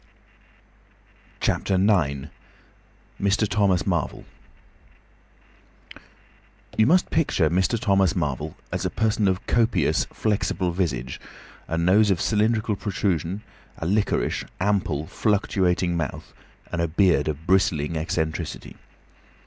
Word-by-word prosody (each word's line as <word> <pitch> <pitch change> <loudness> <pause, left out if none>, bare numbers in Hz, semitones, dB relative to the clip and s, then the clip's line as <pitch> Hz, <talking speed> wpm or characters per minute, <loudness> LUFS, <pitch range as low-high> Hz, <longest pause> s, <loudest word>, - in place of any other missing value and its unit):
CHAPTER 95 - 0
IX. 80 -8 +1 0.9
MR. 105 +2 +2
THOMAS 100 -4 +2
MARVEL 85 -6 -2 2.5
You 110 - +4
must 180 +4 +3
picture 95 - +2
Mr. 95 +6 +1
Thomas 95 -2 +2
Marvel 75 -2 -2 0.2
as - - -2
a - - 0
person 110 -2 +1
of 95 0 -1
copious, 115 -10 +2
flexible 100 -4 -1
visage, 65 -9 -2 0.5
a 85 - -2
nose 95 +5 +4
of 95 -4 +2
cylindrical 110 0 +1
protrusion, 95 -1 -2 0.3
a - - -5
liquorish, 100 +4 0 0.2
ample, 90 -7 0
fluctuating 95 -3 0
mouth, 80 -5 -4 0.4
and 90 - -1
a 85 - +1
beard 85 +1 +2
of 75 +1 -4
bristling 85 -4 +2
eccentricity. 80 0 -3
95 Hz, 105 wpm, -24 LUFS, 80-105 Hz, 2.5 s, You